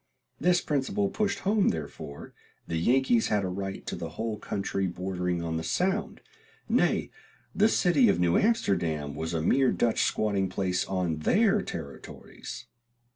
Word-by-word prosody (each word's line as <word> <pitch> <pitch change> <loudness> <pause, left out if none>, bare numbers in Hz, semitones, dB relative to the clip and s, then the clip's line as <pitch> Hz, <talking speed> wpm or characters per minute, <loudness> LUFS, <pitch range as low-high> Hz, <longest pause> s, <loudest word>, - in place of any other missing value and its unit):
This 175 +1 +3
principle 195 +9 0
pushed 210 -1 -1
home, 205 +1 +3
therefore, 70 -2 -6 0.3
the 85 - -2
Yankees 120 +4 +3
had 105 -2 +1
a - - -2
right 95 +1 -5
to - - -4
the 85 - -5
whole 110 -1 -3
country 95 -2 -2
bordering 90 -1 -2
on 80 -1 -2
the 80 - -3
Sound; 190 - -1 0.5
nay, - - +1 0.4
the 215 +2 +4
city 215 +5 +4
of - - +2
New 85 -1 +3
Amsterdam 85 - +1
was 80 +3 -4
a 80 - -1
mere 130 +8 +3
Dutch 115 -2 +1
squatting 100 -3 +1
place 90 -1 -1
on 90 -4 -1
their 205 - +3
territories. 70 - -8
100 Hz, 150 wpm, -28 LUFS, -, 0.5 s, the